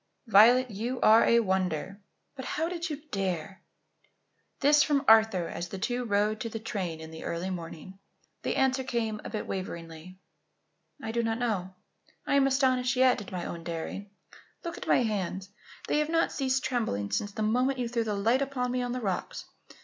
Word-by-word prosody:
"Violet, 240 +3 +6
you 235 +5 -3
are 220 +1 +7
a 235 0 +5
wonder. 190 -2 -1 0.3
But 260 - -7
how 320 +2 -1
did 340 0 -4
you 295 -1 -6
dare?" 190 -1 -3 1.0
This 295 +1 +5
from 285 -1 +2
Arthur 220 -6 +5
as 170 +1 -5
the 195 - -6
two 245 +5 -2
rode 210 0 +1
to 230 - -3
the 225 - -5
train 195 -7 -4
in 160 0 -9
the 160 - -9
early 175 +3 -3
morning. 175 +2 -8 0.4
The - - -2
answer 265 0 +2
came 225 -4 -2
a - - -6
bit 215 - -4
waveringly. 170 -1 -6 0.9
"I 220 - -3
do 235 +1 0
not 225 -1 -1
know. 195 -6 -2 0.5
I - - 0
am 275 -1 +5
astonished 260 -1 +2
yet, 255 -3 +4
at 200 - -10
my 180 -2 -4
own 170 -1 -6
daring. 170 +4 -5 0.5
Look 340 -1 -4
at - - -8
my - - +4
hands. 195 -3 -3 0.4
They 295 - +2
have 300 0 0
not 330 0 +2
ceased 265 -1 0
trembling 105 - -1
since 205 - -1
the 215 - -2
moment 250 +5 +1
you 245 -1 -1
threw 230 0 -1
the 215 -2 -2
light 230 +7 +2
upon 260 -3 -1
me 250 0 0
on 245 0 -2
the 255 - -3
rocks. 195 -5 -3
220 Hz, 190 wpm, -29 LUFS, 190-255 Hz, 1.0 s, are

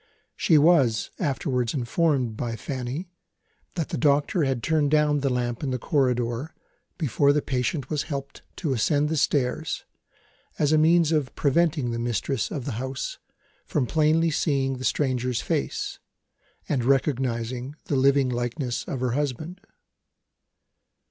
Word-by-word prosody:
She 160 - +4
was, 145 -8 +4
afterwards 130 -6 -1
informed 130 -2 +1
by 115 0 -3
Fanny 135 - -5 0.6
that 165 -4 -2
the - - -3
doctor 145 -1 +2
turned 150 +4 +1
down 150 -1 +3
the 140 0 0
lamp 120 -2 -1
in 145 - -2
the 130 - -1
corridor, 125 +1 0 0.4
before 145 -2 +2
the 145 0 +1
patient 130 +2 -2
was 150 -2 +1
helped 140 -2 -5
to 155 -6 -1
ascend 145 +5 +1
the 160 - 0
stairs, 145 0 0 0.7
as 145 -1 +2
a 155 - +5
means 165 0 +4
of 150 -5 0
preventing 150 -3 +1
the 115 - -3
mistress 120 0 -1
of 140 -5 -5
the 140 - -2
house 130 0 -4 0.5
from 140 - 0
plainly 160 +4 +2
seeing 135 -3 0
the 130 - -4
stranger's 125 -4 0
face, - - -2 0.7
and 130 -5 0
recognising 130 -1 0
the 145 - -1
living 135 0 +4
likeness 120 +1 -2
of 130 - -4
her 125 -1 0
husband. 150 +7 -3
140 Hz, 140 wpm, -25 LUFS, 125-150 Hz, 0.7 s, a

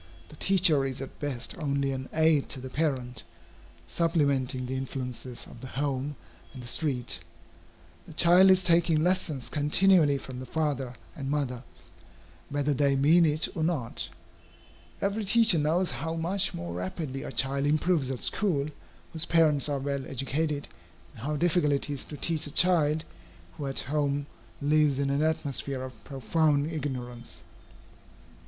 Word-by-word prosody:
The - - -12
teacher 180 -7 +4
is 135 -1 -3
at 135 - -8
best 130 -5 -2
only 140 -2 0
an 130 0 -5
aid 160 -3 +2
to 135 - -4
the 130 0 -8
parent, 130 -5 -2 0.6
supplementing 140 - 0
the 125 - -4
influences 125 -2 -4
of 115 - -13
the 130 - -7
home 140 +1 -3 0.4
and 125 - -9
the - - -8
street. 125 - -1 0.9
The - - -11
child 175 +4 +6
is 185 0 +5
taking 165 -2 +3
lessons 165 -7 0
continually 150 0 +4
from 130 -2 -8
the 130 - -8
father 140 -4 -2 0.2
and 135 -2 -5
mother, 135 -4 -2 0.9
whether 145 0 0
they 140 0 +2
mean 160 +5 +5
it 150 +2 +1
or 160 - -1
not. 150 -8 -2 0.9
Every 200 +2 0
teacher 220 -3 +5
knows 165 +5 +1
how 165 0 -4
much 180 +4 +1
more 85 0 -5
rapidly 130 - -4
a - - -6
child 140 +1 0
improves 155 -2 +1
at 130 -2 -3
school, 155 -8 0 0.4
whose 160 0 -1
parents 155 -4 +3
are 145 - 0
well 140 0 -3
educated, 145 +3 -2 0.5
and - - -10
how 150 - -1
difficult 165 -2 +2
it 140 +1 -1
is 140 -3 -4
to 150 - -9
teach 155 -1 0
a - - -7
child 160 -2 +3 0.5
who 145 - -4
at 135 - +3
home 145 0 -1 0.4
lives 150 -1 +3
in 140 0 0
an 140 +1 +1
atmosphere 140 -4 -1
of 125 -5 -10
profound 145 +4 0
ignorance. 125 - -6
145 Hz, 155 wpm, -28 LUFS, 135-160 Hz, 0.9 s, child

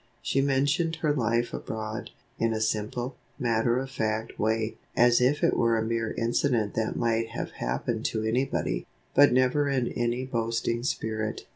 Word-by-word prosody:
She 135 - +1
mentioned 140 +5 +1
her 155 -2 +1
life 120 -3 0
abroad, 110 0 -5 0.3
in 115 0 +2
a 110 - -1
simple, 110 +4 -2 0.2
matter 120 0 +1
of 135 +1 -3
fact 110 -3 -2
way 110 +1 0 0.2
(as 120 0 +5
if 140 +4 +2
it - - +4
were 115 -1 +3
a 110 - 0
mere 115 0 -1
incident 115 -2 +1
that 110 -1 -1
might 115 -1 +1
have - - -5
happened 90 - -2
to 110 -1 -1
anybody), 115 - -1 0.3
but 145 +1 +7
never 130 +3 +3
in 130 -3 +1
any 120 +2 -1
boasting 115 -1 -1
spirit. 110 -3 -2
115 Hz, 160 wpm, -27 LUFS, 110-130 Hz, 0.3 s, but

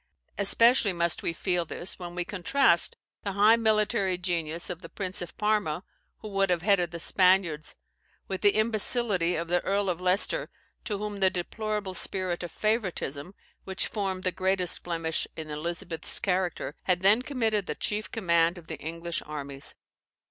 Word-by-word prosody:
Especially 225 +1 +4
must 170 -1 0
we - - -1
feel 175 +1 0
this, 175 +3 -5
when 175 -1 -7
we 175 -1 -2
contrast 190 +1 +2 0.3
the 200 - -4
high 210 +3 +5
military 215 -4 +1
genius 170 -2 -2
of 175 - -6
the 165 - -10
Prince 190 -2 -4
of 175 - -8
Parma, 210 -6 0 0.4
who 215 - -7
would 195 -1 +1
have 175 -1 +1
headed 190 -4 +3
the 170 - -7
Spaniards, 180 -4 +2 0.5
with 190 - -4
the 205 - +4
imbecility 215 -4 +4
of 165 +1 -3
the 175 +1 +2
Earl 200 0 0
of 175 0 -6
Leicester, 185 +2 +2 0.4
to 210 - -2
whom 205 0 -5
the 190 -1 +5
deplorable 210 +2 -3
spirit 185 -1 +1
of 175 - -6
favouritism, 190 - -2 0.3
which 190 0 -1
formed 190 -3 -3
the 185 - +2
greatest 185 -1 +1
blemish 165 -2 -2
in 155 -1 -6
Elizabeth's 170 +2 +1
character, 180 -2 -1
had 180 -1 +1
then 205 +5 +5
committed 225 -7 -1
the - - -3
chief 215 +1 -3
command 170 -4 +1
of 170 - -12
the - - -6
English 165 +2 -4
armies. 140 -2 -5
185 Hz, 165 wpm, -27 LUFS, 170-205 Hz, 0.5 s, high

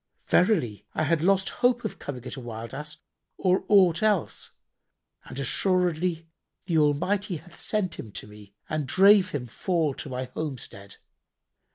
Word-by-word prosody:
Verily, 120 - +2
I 155 - +1
had 160 0 +1
lost 195 +2 +3
hope 245 -1 +3
of 215 - -4
coming 130 -4 -7
at - - -6
a - - -7
wild 115 -1 -7
Ass 150 +2 -7 0.4
or 185 0 +2
aught 185 -5 +5
else; 210 -6 0 0.7
and 130 - -10
assuredly[FN#81] 175 +3 0 0.4
the 170 -3 +1
Almighty 180 +6 +1
hath 170 +2 -15
sent 205 -5 -1
him 110 - -7
to - - -6
me 105 -1 -15
and 155 -3 -2
drave 195 +4 +6
him 145 -7 -4
fall 160 - -1
to 140 - -7
my 130 0 -3
homestead." 125 -10 -6
160 Hz, 155 wpm, -26 LUFS, 130-185 Hz, 0.7 s, drave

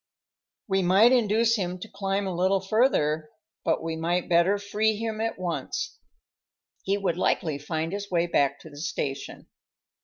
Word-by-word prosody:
We 195 -1 +2
might 195 +7 +5
induce 230 -1 +3
him 180 -2 -2
to 180 - -8
climb 195 0 -2
a 190 - -2
little 185 +3 +2
further, 185 - +1 0.3
but - - 0
we 165 0 -2
might 170 +2 -1
better 175 +4 +4
free 210 +2 0
him 220 0 -3
at 225 0 -2
once; 170 -7 -4 0.8
he 195 +1 0
would 185 -4 -1
likely 155 -5 0
find 160 +3 -3
his 200 0 -4
way 170 -1 +2
back 140 -4 +1
to 160 - -12
the 145 - -13
station. 145 -3 -4
185 Hz, 160 wpm, -26 LUFS, 165-205 Hz, 0.8 s, might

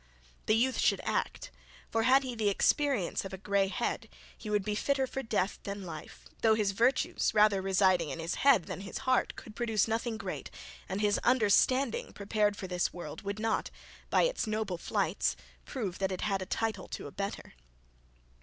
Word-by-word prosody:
The 215 - +4
youth 255 +3 +2
should - - +3
ACT; - - -2 0.4
for 225 - +2
had 260 +4 +5
he 255 -2 -4
the 220 -3 +1
experience 255 0 +1
of 195 - -7
a - - -4
grey 200 0 +1
head, 190 - -2 0.3
he 215 - -8
would 210 -2 +1
be 210 - -1
fitter 270 +5 +1
for 270 +1 -4
death 210 -5 -1
than 200 0 -5
life, 155 -3 -9 0.2
though 220 -1 +5
his 210 -2 +1
virtues, 235 +2 +1
rather 210 -2 +5
residing 185 -3 +3
in - - -4
his 165 +1 -3
head 270 -10 +6
than 180 - -6
his 195 - -6
heart 255 -1 +2
could 215 - -11
produce 225 -4 +1
nothing 225 0 -1
great, - - -5 0.4
and 195 +2 -2
his 205 -1 +2
understanding 250 +2 +2
prepared 205 0 0
for - - -5
this 180 -1 0
world, 170 -4 -7
would 200 0 -4
not, 220 0 0 0.4
by - - +4
its - - 0
noble 215 -5 -2
flights, - - 0 0.3
prove 205 -10 -4
that 190 -1 0
it 185 - -4
had 195 -2 0
a 185 - -5
title 220 -2 -2
to - - -6
a 145 - -7
better. 200 +4 -5
210 Hz, 190 wpm, -31 LUFS, 195-230 Hz, 0.4 s, head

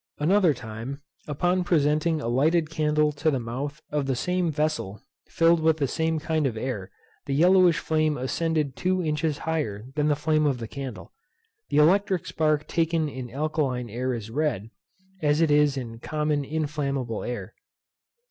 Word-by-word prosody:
At - - -6
another 190 -6 +4
time, 115 +5 -7 0.2
upon 175 +5 +1
presenting 155 -1 +2
a - - -3
lighted 155 +6 +2
candle 150 -1 +2
to 150 +2 0
the 135 -4 0
mouth 135 +6 -5
of 145 -2 -1
the 135 - +1
same 180 +5 0
vessel, 150 -10 -2 0.3
filled 165 0 +4
with 160 0 +3
the 140 -3 0
same 160 +3 0
kind 155 -1 0
of 115 -4 -4
air, 110 -6 -4 0.4
the 135 - 0
yellowish 180 +2 +5
flame 155 -1 0
ascended 150 +2 -1
two 185 +2 0
inches 150 -1 0
higher 145 -12 -3
than 150 0 +1
the 150 - +3
flame 155 +1 +1
of 135 -3 +1
the 115 -2 -6
candle. 135 -1 -7 0.6
The 145 - 0
electric 185 +3 +3
spark 155 -3 0
taken 165 -2 0
in 130 -3 -7
alkaline 135 -3 -2
air 125 +2 -2
is 110 -1 -7
red, 125 -6 -1 0.5
as 150 0 +2
it 165 -2 +3
is 145 -1 +4
in 115 -3 -6
common 150 +1 -1
inflammable 140 -6 -2
air. 120 0 -5
150 Hz, 165 wpm, -26 LUFS, 130-160 Hz, 0.6 s, yellowish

